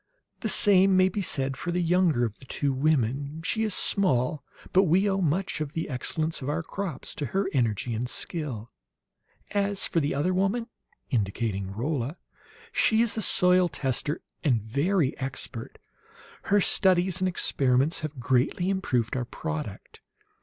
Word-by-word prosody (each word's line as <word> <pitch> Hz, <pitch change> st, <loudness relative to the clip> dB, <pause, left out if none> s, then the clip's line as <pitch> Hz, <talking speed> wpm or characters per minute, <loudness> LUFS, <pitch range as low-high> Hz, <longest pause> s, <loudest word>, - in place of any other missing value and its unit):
The 220 Hz, -, -1 dB
same 195 Hz, -2 st, +5 dB
may 185 Hz, 0 st, +5 dB
be 200 Hz, +2 st, -3 dB
said 135 Hz, -6 st, 0 dB
for 175 Hz, -, -5 dB
the 175 Hz, -, 0 dB
younger 170 Hz, -7 st, +2 dB
of 110 Hz, -2 st, -6 dB
the 130 Hz, -, -14 dB
two 140 Hz, +1 st, -1 dB
women; 140 Hz, +2 st, 0 dB
she 220 Hz, +5 st, -1 dB
is 215 Hz, -3 st, +1 dB
small, 150 Hz, -6 st, +1 dB, 0.3 s
but 190 Hz, +1 st, +5 dB
we 185 Hz, +5 st, +3 dB
owe 195 Hz, -1 st, 0 dB
much 170 Hz, 0 st, -1 dB
of 150 Hz, -1 st, -4 dB
the 160 Hz, -, -3 dB
excellence 155 Hz, +5 st, -2 dB
of 130 Hz, -, -3 dB
our 160 Hz, +3 st, -1 dB
crops 195 Hz, 0 st, -5 dB
to 145 Hz, -, -3 dB
her 195 Hz, +9 st, 0 dB
energy 120 Hz, -2 st, 0 dB
and 120 Hz, +3 st, -2 dB
skill. 130 Hz, -11 st, -4 dB, 0.8 s
"As 200 Hz, -1 st, 0 dB
for 165 Hz, -, +1 dB
the 145 Hz, -2 st, -1 dB
other 155 Hz, +6 st, +1 dB
woman," 195 Hz, +6 st, 0 dB, 0.5 s
indicating 100 Hz, -3 st, -1 dB
Rolla, 130 Hz, -, -3 dB, 0.5 s
"she 225 Hz, +1 st, +3 dB
is 235 Hz, -, 0 dB
a 220 Hz, -, -1 dB
soil 180 Hz, -3 st, +4 dB
tester, 140 Hz, +1 st, -2 dB, 0.2 s
and 120 Hz, -8 st, +2 dB
very 145 Hz, -, 0 dB
expert. 130 Hz, -3 st, -5 dB, 0.7 s
Her 205 Hz, 0 st, +3 dB
studies 185 Hz, -1 st, +2 dB
and 185 Hz, -, +2 dB
experiments 135 Hz, -4 st, +1 dB
have 155 Hz, -3 st, -6 dB
greatly 130 Hz, +9 st, +1 dB
improved 130 Hz, -, -1 dB
our 125 Hz, -2 st, -1 dB
product. 150 Hz, -7 st, -6 dB
155 Hz, 160 wpm, -27 LUFS, 130-185 Hz, 0.8 s, same